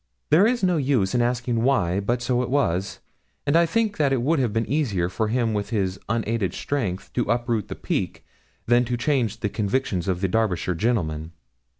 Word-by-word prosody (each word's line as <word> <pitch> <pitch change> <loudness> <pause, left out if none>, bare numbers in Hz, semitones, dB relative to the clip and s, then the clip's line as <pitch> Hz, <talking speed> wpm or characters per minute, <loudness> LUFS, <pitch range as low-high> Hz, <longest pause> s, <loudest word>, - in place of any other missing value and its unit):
There 185 +7 +6
is 240 -2 0
no 180 -2 +3
use 130 -9 +1
in 125 - +2
asking 120 -1 0
why; 100 -8 +2
but 120 +4 -1
so 125 0 +1
it 125 - -3
was, 95 -9 0 0.4
and 145 +2 +2
I 170 0 +5
think 215 +1 0
it 135 -4 +2
would 155 +3 +2
have 125 -5 +1
been 115 +1 0
easier 110 - 0
for 110 +4 -1
him 115 0 0
with 105 0 -2
his 95 -4 -1
unaided 115 -3 -1
strength 105 -10 -3
to - - -1
uproot 120 -2 0
the - - -6
Peak - - -3 0.4
than 120 +1 +4
to 120 0 -2
change 120 -6 0
the 105 - 0
convictions 100 -4 -1
of 90 -1 -1
the 95 - +2
Derbyshire 90 -3 0
gentlemen. 80 -6 -1
115 Hz, 195 wpm, -24 LUFS, 100-135 Hz, 0.4 s, There